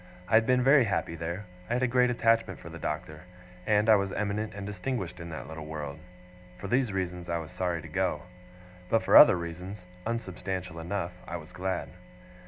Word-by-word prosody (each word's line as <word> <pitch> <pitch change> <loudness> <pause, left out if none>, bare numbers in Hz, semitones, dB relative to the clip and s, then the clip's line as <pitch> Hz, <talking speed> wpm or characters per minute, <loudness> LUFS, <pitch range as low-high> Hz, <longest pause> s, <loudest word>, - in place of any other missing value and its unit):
I - - -5
had 110 0 +6
been 125 0 +4
very 135 -1 +6
happy 95 -5 -1
there, 85 +5 -4 0.2
I - - 0
had 125 +1 +1
a - - +4
great 125 0 +3
attachment 115 -1 +2
for - - -10
the - - -9
Doctor, 75 0 -4 0.5
and 105 0 +3
I 110 -1 +8
was 100 -1 -1
eminent 105 +1 -2
and 100 -1 -6
distinguished 100 -2 -4
in 85 0 -7
that 80 - -6
little 80 -1 -7
world. 75 -2 -5 0.6
For 100 - -6
these 125 +1 +2
reasons 90 -2 -3
I 85 - +1
was 80 -2 -7
sorry 90 -3 -2
to - - -8
go; - - -1 0.7
but 115 - +3
for - - +3
other 150 - +10
reasons, 90 +3 -7 0.2
unsubstantial 95 -6 -4
enough, 85 +1 -3 0.2
I 85 - -4
was 80 +1 -12
glad. 95 +1 -3
95 Hz, 195 wpm, -29 LUFS, 85-110 Hz, 0.7 s, other